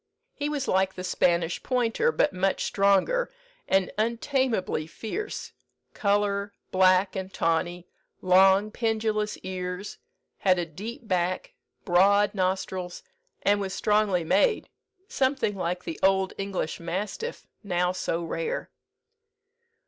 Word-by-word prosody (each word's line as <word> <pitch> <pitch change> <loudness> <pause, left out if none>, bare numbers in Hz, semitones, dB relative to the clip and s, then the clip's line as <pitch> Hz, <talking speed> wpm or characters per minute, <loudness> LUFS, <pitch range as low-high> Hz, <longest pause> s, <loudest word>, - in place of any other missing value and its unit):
He 290 0 -3
was 290 -3 -2
like 190 0 +2
the 185 - -6
Spanish 170 -2 +1
pointer, 250 - +1
but 295 - +1
much 190 +1 0
stronger, 200 - +2 0.4
and 190 -1 +2
untameably 230 - 0
fierce, 400 - -5 0.4
colour, 200 -1 0 0.2
black 185 +1 +4
and 190 0 -4
tawny, 175 +1 -1 0.3
long 190 +3 +5
pendulous 220 -2 -1
ears, 185 +1 -5 0.4
had 185 -2 +3
a 175 - -1
deep 220 - -8
back, 180 -1 -1 0.3
broad 200 +3 +4
nostrils, 185 -2 -2 0.4
and 205 +1 +3
was 190 -1 -3
strongly 210 -4 +2
made, 440 - +2 0.4
something 260 - 0
like 180 -1 -2
the 165 - -6
old 190 0 +3
English 195 -5 -3
mastiff, 195 - -4 0.2
now 180 -2 +1
so 170 -2 -2
rare." 165 0 -3
195 Hz, 115 wpm, -27 LUFS, 180-215 Hz, 0.4 s, long